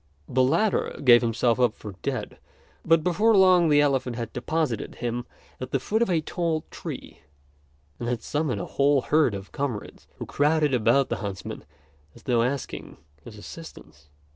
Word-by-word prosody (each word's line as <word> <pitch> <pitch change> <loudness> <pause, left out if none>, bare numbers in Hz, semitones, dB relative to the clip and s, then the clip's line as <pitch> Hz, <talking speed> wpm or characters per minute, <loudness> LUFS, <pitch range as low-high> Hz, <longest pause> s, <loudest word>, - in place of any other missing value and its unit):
The 130 - +1
latter 195 +11 +1
gave 120 -3 +7
himself 115 0 +1
up 120 -3 +2
for 105 - -8
dead; - - -4 0.4
but 165 -1 +3
before 210 +5 +3
long 185 -3 +5
the 145 -1 +5
elephant 135 -4 0
had 115 -1 -5
deposited 130 -3 -2
him 120 0 -4 0.3
at 130 - -5
the 135 - 0
foot 215 - -1
of 235 - +2
a 170 -3 +2
tall 165 -1 -2
tree, - - -8 0.8
and 120 - -3
had 120 -1 -2
summoned 150 -3 -1
a - - -4
whole 140 0 +2
herd 150 -8 +2
of 100 0 -9
comrades, 135 -7 -5
who - - -6
crowded 150 0 +1
about 125 +3 +3
the - - -1
huntsman 100 -3 -6 0.5
as - - -16
though 120 -2 +2
asking 130 +3 -3 0.3
his 110 -3 -11
assistance. 90 - -12
135 Hz, 165 wpm, -25 LUFS, 120-160 Hz, 0.8 s, gave